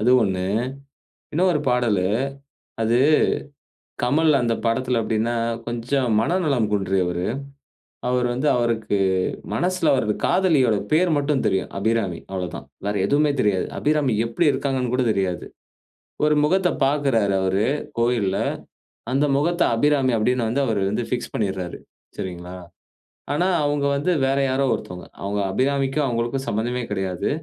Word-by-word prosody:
அது 120 Hz, -, +3 dB
ஒண்ணு, 95 Hz, -3 st, -1 dB, 0.9 s
இன்னொரு 175 Hz, -1 st, +2 dB
பாடலு 120 Hz, -7 st, +2 dB, 0.8 s
அது, 115 Hz, +2 st, +2 dB, 1.1 s
கமல் 150 Hz, +6 st, +3 dB
அந்த 115 Hz, -2 st, +1 dB
படத்துல 125 Hz, +1 st, +1 dB
எப்டினா, 110 Hz, +2 st, 0 dB, 0.3 s
கொஞ்சம் 120 Hz, +1 st, 0 dB
மனநலம் 140 Hz, -, +1 dB
குன்றியவரு. 95 Hz, -3 st, 0 dB, 0.8 s
அவரு 125 Hz, 0 st, +1 dB
வந்து 135 Hz, +4 st, 0 dB
அவருக்கு 115 Hz, -3 st, 0 dB, 0.6 s
மனசுல 180 Hz, -3 st, +1 dB
அவரது 110 Hz, -6 st, +1 dB
காதலியோட 150 Hz, -, +3 dB, 0.2 s
பேர் 170 Hz, +3 st, +4 dB
மட்டும் 145 Hz, -2 st, +1 dB
தெரியும். 95 Hz, -2 st, 0 dB
'அபிராமி' 105 Hz, -4 st, 0 dB
அவ்ளோதான். 90 Hz, -8 st, -5 dB, 0.2 s
வேற 105 Hz, -, 0 dB
எதுவுமே 145 Hz, +3 st, +2 dB
தெரியாது. 100 Hz, -4 st, +1 dB
'அபிராமி' 150 Hz, -5 st, +1 dB
எப்டி 115 Hz, +9 st, 0 dB
இருக்காங்கன்னு 130 Hz, -2 st, -1 dB
கூட 130 Hz, 0 st, +2 dB
தெரியாது. 95 Hz, -4 st, -1 dB, 0.8 s
ஒரு 150 Hz, 0 st, +4 dB
முகத்த 185 Hz, +3 st, +2 dB, 0.2 s
பார்க்கிறாரு 135 Hz, -8 st, +1 dB
அவரு, 95 Hz, +3 st, +1 dB, 0.3 s
கோவில்ல. 115 Hz, -5 st, +1 dB, 0.7 s
அந்த 140 Hz, +3 st, +2 dB
முகத்த 170 Hz, +4 st, 0 dB
'அபிராமி' 135 Hz, -1 st, +2 dB
அப்டின்னு 120 Hz, +2 st, +1 dB
வந்து 140 Hz, +5 st, 0 dB
அவரு 100 Hz, -4 st, 0 dB
வந்து 115 Hz, +3 st, -1 dB
பிக்ஸ் 120 Hz, -, -4 dB
பண்ணிர்றாரு. 95 Hz, -5 st, -3 dB, 0.4 s
சரிங்களா? 90 Hz, 0 st, -6 dB, 0.8 s
ஆனா 175 Hz, +5 st, +1 dB, 0.2 s
அவுங்க 145 Hz, -1 st, 0 dB
வந்து 145 Hz, +6 st, 0 dB
வேற 135 Hz, +1 st, +1 dB
யாரோ 130 Hz, +1 st, +1 dB
ஒருத்தவங்க. 90 Hz, 0 st, -6 dB
அவங்க 100 Hz, +1 st, -2 dB
'அபிராமிக்கும்', 135 Hz, +5 st, +1 dB
அவங்களுக்கும் 120 Hz, +2 st, -2 dB
சம்மந்தமே 120 Hz, +4 st, -1 dB
கெடையாது. 95 Hz, -3 st, -2 dB
120 Hz, 125 wpm, -22 LUFS, 105-140 Hz, 1.1 s, பேர்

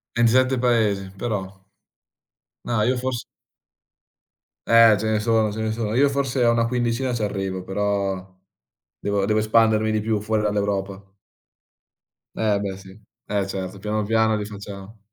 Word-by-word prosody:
27 130 Hz, +3 st, +3 dB
paesi, 105 Hz, -6 st, +1 dB
però. 95 Hz, -3 st, -4 dB, 1.0 s
Ma, 115 Hz, -3 st, 0 dB
io 130 Hz, 0 st, +1 dB
fors 125 Hz, -1 st, -3 dB, 1.5 s
Eh, 115 Hz, -2 st, +7 dB
ce 110 Hz, -, -3 dB
ne 110 Hz, -1 st, +1 dB
sono, 110 Hz, -1 st, +2 dB
ce 110 Hz, +2 st, -5 dB
ne 110 Hz, 0 st, -1 dB
sono. 110 Hz, -1 st, -3 dB
Io 140 Hz, +2 st, +4 dB
forse 135 Hz, -2 st, 0 dB
a 120 Hz, -, +5 dB
una 115 Hz, 0 st, +2 dB
quindicina 120 Hz, +1 st, -1 dB
c'arrivo, 95 Hz, -4 st, -3 dB
però 95 Hz, -2 st, -2 dB, 0.6 s
devo 100 Hz, -1 st, 0 dB
devo 110 Hz, 0 st, +2 dB
espandermi 110 Hz, 0 st, +3 dB
di 110 Hz, 0 st, +1 dB
più 110 Hz, -1 st, -1 dB
fuori 110 Hz, 0 st, -1 dB
dall'Europa. 100 Hz, -1 st, -2 dB, 1.2 s
Eh, 105 Hz, -2 st, +1 dB
beh, 95 Hz, -2 st, -4 dB
sì. 95 Hz, +1 st, -14 dB, 0.3 s
Eh, 100 Hz, -2 st, 0 dB
certo, 95 Hz, 0 st, -5 dB
piano 105 Hz, +1 st, -2 dB
piano 110 Hz, +1 st, +2 dB
li 105 Hz, -, -4 dB
facciamo. 100 Hz, 0 st, -10 dB
105 Hz, 145 wpm, -23 LUFS, 100-115 Hz, 1.5 s, Eh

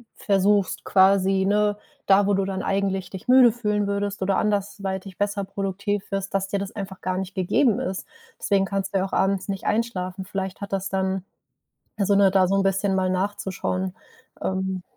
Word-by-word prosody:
versuchst 200 Hz, 0 st, +1 dB
quasi, 190 Hz, 0 st, +4 dB
ne, 205 Hz, +1 st, +2 dB, 0.3 s
da, 195 Hz, +1 st, +5 dB
wo 205 Hz, -, +3 dB
du 195 Hz, 0 st, +1 dB
dann 190 Hz, -1 st, -3 dB
eigentlich 195 Hz, -1 st, -1 dB
dich 190 Hz, -1 st, -9 dB
müde 255 Hz, -1 st, +7 dB
fühlen 210 Hz, -3 st, -1 dB
würdest 200 Hz, 0 st, -2 dB
oder 190 Hz, 0 st, +1 dB
anderweitig 195 Hz, -2 st, -2 dB
besser 205 Hz, 0 st, -1 dB
produktiv 195 Hz, +1 st, -3 dB
wirst, 195 Hz, 0 st, -3 dB
dass 195 Hz, 0 st, 0 dB
dir 200 Hz, -, -1 dB
das 195 Hz, +1 st, -4 dB
einfach 195 Hz, -2 st, -6 dB
gar 185 Hz, 0 st, -2 dB
nicht 190 Hz, +1 st, -5 dB
gegeben 200 Hz, +5 st, +2 dB
ist. 190 Hz, +1 st, -4 dB, 0.3 s
Deswegen 195 Hz, -1 st, +2 dB
kannst 195 Hz, 0 st, -3 dB
du 195 Hz, -, +2 dB
ja 190 Hz, -, 0 dB
auch 195 Hz, -, -9 dB
abends 195 Hz, 0 st, +1 dB
nicht 195 Hz, -1 st, -4 dB
einschlafen. 190 Hz, -4 st, -1 dB
Vielleicht 190 Hz, +1 st, -4 dB
hat 200 Hz, -, -6 dB
das 195 Hz, 0 st, -1 dB
dann 190 Hz, -1 st, -1 dB, 0.7 s
also, 200 Hz, 0 st, +2 dB
ne, 200 Hz, -1 st, +6 dB
da 190 Hz, -1 st, +4 dB
so 195 Hz, -, +1 dB
'n 195 Hz, -, +3 dB
bisschen 195 Hz, +1 st, +1 dB
mal 185 Hz, -1 st, +1 dB
nachzuschauen, 185 Hz, -1 st, -2 dB, 0.5 s
ähm. 190 Hz, 0 st, -2 dB
195 Hz, 185 wpm, -24 LUFS, 190-200 Hz, 0.7 s, müde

